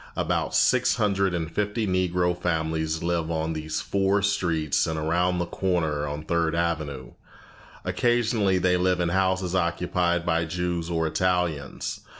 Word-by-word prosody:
About - - -1
six - - +3
hundred 100 -4 +1
and 85 -1 -3
fifty 105 +3 -1
Negro 90 -2 +1
families 80 -2 -1
live 85 -1 -1
on 80 0 -1
these 80 0 -3
four 100 0 +1
streets 85 -7 +1
and 80 - -2
around 85 +4 +1
the 90 - 0
corner 80 -6 -1
on 75 +1 -5
Third 85 0 0
Avenue. 75 -6 -2 0.7
Occasionally 115 -5 +2
they 90 0 +2
live 90 0 +1
in 85 -1 +1
houses 95 0 0
occupied 85 -1 0
by 85 -1 +1
Jews 85 0 -2
or 80 -1 0
Italians. 85 -4 -1
85 Hz, 145 wpm, -25 LUFS, 80-95 Hz, 0.7 s, six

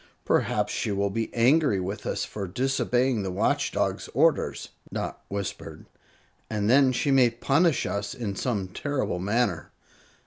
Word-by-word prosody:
"Perhaps - - +1
she - - -1
will 100 0 0
be 115 +2 -2
angry 130 -2 +3
with 95 +3 -4
us - - -1
for 100 -2 -5
disobeying 125 +2 +1
the 95 - -3
Watch 90 - 0
Dog's - - -1
orders," - - +2 0.2
Dot - - -4
whispered; 100 0 -6 0.6
"and 105 -2 -1
then 130 +2 +5
she 140 +3 0
may 130 -3 +5
punish 140 +7 +2
us 100 +5 -3
in 110 -6 -4
some 100 -5 -2
terrible 130 -3 -2
manner." 100 -3 0
115 Hz, 145 wpm, -26 LUFS, 100-130 Hz, 0.6 s, then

